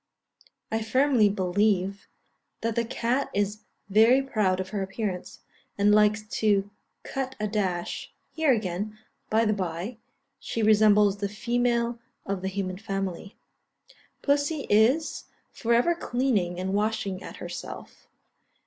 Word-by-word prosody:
I 225 0 0
firmly 245 -1 +3
believe 195 0 0 0.5
that 230 0 0
the 235 - +2
cat 245 +3 -1
is 205 +1 -1 0.2
very 220 +6 +5
proud 210 -8 +1
of 185 0 -4
her 205 -2 -3
appearance, 195 -1 -4 0.4
and 205 +1 +4
likes 210 0 +4 0.2
to 205 -2 +2 0.3
cut 265 -1 -4
a 210 - 0
dash 190 -5 -2 0.2
here 320 -3 +2
again, 210 -1 -2 0.3
by 225 +1 +3
the 215 - +2
bye, 190 +4 -4 0.4
she 225 - -3
resembles 210 -1 +5
the 200 0 -2
female 235 +2 0 0.3
of 195 -1 -3
the 190 - -2
human 190 -1 -3
family. 195 -2 -4 0.9
Pussy 285 +1 +1
is 240 +10 +3 0.3
for 235 - -3
ever 240 +9 +4
cleaning 240 - 0
and 190 +1 -2
washing 205 -2 -1
at - - -9
herself. - - -8
210 Hz, 130 wpm, -27 LUFS, 195-235 Hz, 0.9 s, very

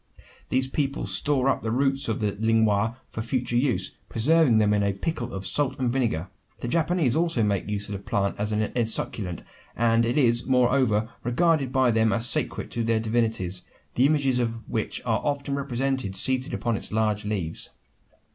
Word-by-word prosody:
These 130 +1 +1
people 140 0 -2
store 130 +8 +1
up 135 - +1
the 110 - -3
roots 135 +3 +1
of 110 - -2
the 105 -1 +1
lienwha 110 +1 +1
for 110 - -6
winter 120 +1 -2
use 125 0 +1 0.2
preserving 140 +1 +3
them 105 -1 +3
in 105 - +2
a 100 -1 +1
pickle 120 +3 -4
of 95 0 -6
salt 135 +6 0
and 125 -2 0
vinegar. 110 -10 -1 0.3
The - - -5
Japanese 165 -3 +1
also 165 -8 +1
make 100 -1 -1
use 100 -1 -2
of 105 - -5
the 100 - -4
plant 100 0 -1
as 105 +1 -1
an 105 0 -1
esculent; 110 -6 +1 0.3
and 115 0 +3
it 120 +4 0
is, 120 -4 +3
moreover, 125 -4 +2 0.2
regarded 140 +2 +1
by 130 -2 +3
them 110 0 +2
as 120 0 +3
sacred - - -1
to 120 - -2
their 115 0 +1
divinities 110 -5 -1 0.3
the 130 +3 +4
images 140 -4 +1
of 115 -1 -3
which 110 - -3
are 115 -2 0
often 140 -1 -2
represented 135 -6 -2
seated 130 +6 +1
upon 120 -2 -1
its - - -3
large 105 -1 0
leaves. 100 -6 -3
115 Hz, 185 wpm, -25 LUFS, 105-130 Hz, 0.3 s, the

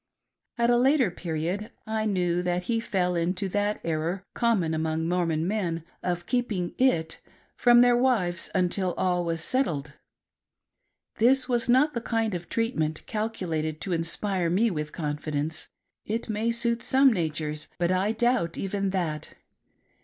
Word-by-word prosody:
At 235 0 +3
a 240 - +4
later 260 -4 +3
period, 175 +5 -3 0.2
I 220 0 -1
knew 180 -3 +1
that 180 0 -1
he 230 +3 0
fell 185 -5 0
iato 180 +3 -1
that 205 +1 0
error, 165 +4 -2
common 205 -9 +1
among 160 0 -1
Mormon 170 -2 0
men, 180 -6 -1 0.2
of 175 -1 -2
keeping 220 -8 -1
"it" 165 -12 +1 0.3
from 240 -1 +6
their 245 0 +5
wives 220 -9 +1
until 185 0 +1
all 180 -1 +1
was 165 -1 -2
settled. 150 - -1 1.3
This 250 +3 +4
was 240 -2 +1
not 280 +5 +4
the 235 - -2
kind 225 -2 -1
of 175 -1 -5
treatment 160 -10 -1
calculated 165 -8 -2
to 190 - -2
inspire 170 +2 0
me 210 +6 +2
with 150 -3 -3
confidence; 150 0 -3 0.4
it 225 +2 -3
may 215 +2 0
suit 235 0 +1
some 265 -1 +4
natures, 155 -4 -2
but 175 0 +1
I 190 +3 +2
doubt 230 -7 +1
even 195 0 -1
that. 170 -6 -3
185 Hz, 145 wpm, -27 LUFS, 165-230 Hz, 1.3 s, from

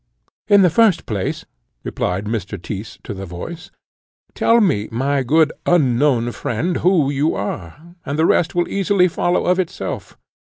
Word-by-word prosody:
"In 205 -2 +6
the 180 - +4
first 205 -2 +3
place," 100 -4 -3 0.4
replied 95 +3 -2
Mr. 105 -2 -4
Tyss 100 +4 -7
to - - -6
the 95 0 -7
voice, 90 - -8 0.6
"tell 230 +1 +3
me, 145 - +1
my 135 +4 0
good 155 +4 +2
unknown 130 -6 +2
friend, 145 +9 -2
who 170 -6 +2
you 145 +3 0
are; 105 - -6
the 150 +3 0
rest 170 0 +2
will 175 0 +1
easily 195 -1 +2
follow 175 +1 0
of 180 +1 +2
itself. 180 -3 -4
150 Hz, 150 wpm, -19 LUFS, 115-175 Hz, 0.6 s, In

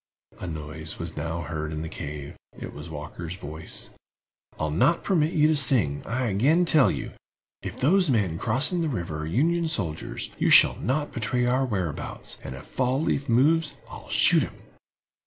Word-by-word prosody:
A 90 - -5
noise 80 0 -6
was 85 0 -6
now 80 +1 -3
heard 75 0 -4
in 80 0 -4
the - - -4
cave; 75 -3 -7 0.2
it - - -7
was 75 +3 -9
Walker's 80 +3 -6
voice. 80 -2 -8 0.7
"I'll 75 -1 -1
not 165 - +2
permit 165 -5 +2
you 150 -1 +4
to 155 - +3
sing, 125 - +3
I 125 +2 -1
again 135 - +3
tell 155 -5 +5
you. - - -4 0.5
If - - -7
those 180 +5 +3
men 100 -10 +1
crossing 135 +10 +2
the 160 - 0
river 85 - -3
are 80 - -4
Union 165 - +1
soldiers, 85 - -3
you - - +2
shall - - +7
not 145 +5 -1
betray 125 +1 0
our 130 +2 +2
whereabouts, 95 - -4
and 65 - -6
if 65 - -10
Fall 130 +1 0
leaf 140 -3 -1
moves 150 +7 +3 0.2
I'll - - -10
shoot - - +5
him!" - - -4
110 Hz, 175 wpm, -26 LUFS, -, 0.7 s, shall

